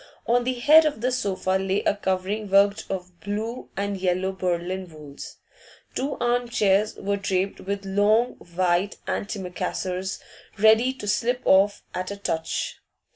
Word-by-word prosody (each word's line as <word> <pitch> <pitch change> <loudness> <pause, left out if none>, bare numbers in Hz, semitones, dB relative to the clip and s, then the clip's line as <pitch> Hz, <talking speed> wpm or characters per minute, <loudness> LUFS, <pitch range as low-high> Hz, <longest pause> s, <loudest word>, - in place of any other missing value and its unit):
On 245 +1 +2
the 255 0 0
head 300 +6 +7
of 290 -7 -3
the 250 +2 +1
sofa 190 -5 0
lay 195 +1 0
a - - +2
covering 200 +2 -2
worked 200 +1 +4
of 180 -2 -5
blue 220 +4 -4
and 200 0 -1
yellow 185 0 0
Berlin 185 0 -2
wools. 150 -3 -10 0.6
Two 280 +2 -2
arm 240 0 0
chairs 210 -3 +2
were 200 0 -2
draped 195 -1 -1
with 200 +1 -4
long 210 +5 +3 0.3
white 180 +2 +1
antimacassars, 185 -1 -3 0.4
ready 220 +4 +5
to 260 -6 -8
slip 245 +5 0
off 200 +2 +4
at 185 0 -3
a 200 - -5
touch. 160 -5 -3
200 Hz, 145 wpm, -25 LUFS, 185-220 Hz, 0.6 s, head